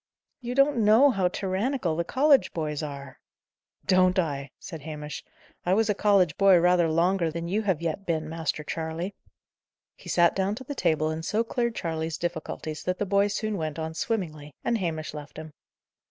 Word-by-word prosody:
"You 245 -1 -5
don't 275 0 +4
know 225 +7 +6
how 195 -5 +1
tyrannical 190 - -1
the 170 - 0
college 275 - +3
boys 155 -2 -2
are." 140 -3 -7 0.7
"Don't 185 -1 +4
I!" 140 -6 -1
said 160 -5 -9
Hamish. 150 0 -7 0.4
"I 180 +2 +2
was 220 0 +2
a - - +2
college 195 -5 +3
boy 195 -2 +6
rather 175 -1 +4
longer 170 +2 +2
than 170 +2 -4
you 205 +5 0
have 190 -6 -1
yet 170 +4 -2
been, 160 -2 -1
Master 160 -1 -3
Charley." 165 +5 -4 0.8
He - - -12
sat 175 -1 +4
down 195 +2 0
to 260 - -8
the 285 - -5
table 155 - +1
and 160 +1 -4
so 215 +6 +1
cleared 235 0 -1
Charley's 160 -2 -3
difficulties 160 -2 -4
that 180 0 -2
the 205 - -1
boy 200 +1 +3
soon 210 +1 -2
went 155 -3 -3
on 160 0 -4
swimmingly, 155 -7 -3
and 235 -1 0
Hamish 160 -5 -3
left 150 -1 -9
him. 155 -1 -8
175 Hz, 185 wpm, -27 LUFS, 155-205 Hz, 0.8 s, know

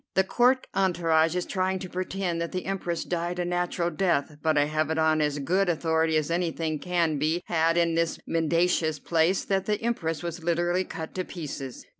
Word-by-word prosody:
The 190 - +5
Court 250 +6 +2
entourage 170 -3 +2
is 180 - -1
trying 190 0 -1
to 185 0 -6
pretend 180 -1 -3
that 170 - -3
the 185 - -4
Empress 180 -3 -2
died 175 0 -2
a 175 - -1
natural 175 0 -1
death, 155 -4 0
but 155 -1 +2
I 145 - +4
have 155 +1 -1
it 160 - -1
on 160 -1 +3
as 150 -1 0
good 180 +7 +1
authority 160 -1 +1
as 155 +1 -1
anything 165 -3 -1
can 170 -4 0
be 160 +4 0
had 165 0 +2
in 170 -1 +3
this 165 0 0
mendacious 165 -1 +1
place 165 +5 +1
that 195 -1 0
the 210 -1 +1
Empress 165 -10 -2
was 170 -1 -5
literally 175 +2 +1
cut 160 -1 -7
to 185 - -2
pieces." 140 -7 -7
170 Hz, 195 wpm, -27 LUFS, 160-180 Hz, -, The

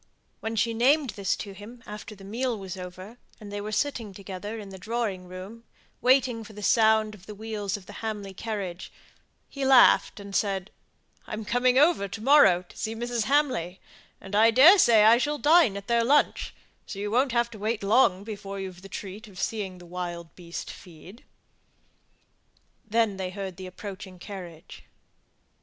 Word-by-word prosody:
When 225 0 -4
she 230 +2 +1
named 265 +3 +3
this 195 -1 -1
to 200 - -7
him 215 +5 -12
after 210 +1 -9
the 195 - -15
meal 235 +4 -2
was 190 -2 -7
over, 185 +5 -9 0.2
and 210 -2 -10
they 205 0 -4
were 210 +1 -5
sitting 225 -4 -2
together 200 +3 -7
in 205 -3 -8
the 190 -1 -10
drawing 210 -3 -3
room, 190 +6 -9 0.4
waiting 250 -3 +3
for 215 - -13
the 210 0 -9
sound 220 0 +3
of 195 -3 -15
the 210 - -8
wheels 210 -1 -4
of 195 - -15
the 205 - -11
Hamley 210 -3 -4
carriage, 195 -4 -5 0.6
he 275 - -6
laughed, 265 -4 +5
and 200 -1 -8
said, 195 -2 -1 0.6
"I'm 215 0 -5
coming 245 +3 +2
over 295 - +4
to 195 - -7
morrow 220 -8 +5
to 180 - -19
see 220 +1 -4
Mrs. 240 -1 -2
Hamley; 245 - +1 0.4
and 195 +1 -7
I 220 +2 +6
daresay 255 - +7
I 225 +2 +7
shall 295 +3 -1
dine 295 - +4
at 200 - -8
their 235 +1 +2
lunch; 285 +5 +2 0.3
so 195 - -7
you 205 +1 -3
won't 255 +3 +2
have 235 0 +1
to 215 - -10
wait 215 +1 -2
long 200 -3 +3
before 200 -2 -7
you've 185 -2 -7
the 195 - -12
treat 205 +4 -8
of 190 -3 -12
seeing 200 -4 -3
the 175 - -13
wild 175 -1 -6
beast 170 -1 -7
feed." 180 +6 -14 1.6
Then 220 -2 0
they 190 -1 -3
heard 190 -1 -6
the 185 -1 -7
approaching 190 0 -9
carriage. 175 -4 -10
210 Hz, 180 wpm, -26 LUFS, 190-230 Hz, 1.6 s, daresay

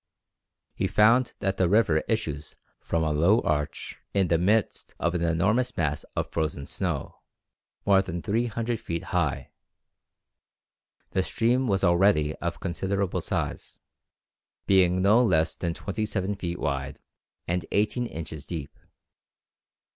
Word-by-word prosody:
He - - -1
found 115 +4 +4
that 95 0 0
the 90 -2 +2
river 100 -6 +4
issues 75 -10 -2 0.2
from 85 -1 -1
a 80 - 0
low 85 +9 +4
arch 75 -2 -2 0.2
in 95 -3 +2
the 85 - +3
midst 105 +5 0
of 85 +1 0
an 90 - -1
enormous 95 +9 +1
mass 75 -2 -1
of - - -2
frozen 75 -3 -2
snow, - - -4 0.7
more 95 -1 +5
than 85 -3 -5
300 115 +1 -1
feet 85 0 -4
high. - - 0 1.6
The 95 - +1
stream 120 +6 +1
was 100 -3 +1
already 85 -4 +4
of 85 0 -4
considerable 95 +1 -2
size, - - -3 0.9
being 95 -1 +4
no 110 +5 +5
less 80 -7 +2
than 85 -2 -3
twenty 110 +2 -3
seven 100 -1 -1
feet 90 -3 -4
wide 70 -2 -3 0.5
and 85 -1 -1
eighteen 110 +4 +1
inches 80 -5 -7
deep. 80 -5 -6
90 Hz, 130 wpm, -26 LUFS, 80-105 Hz, 1.6 s, more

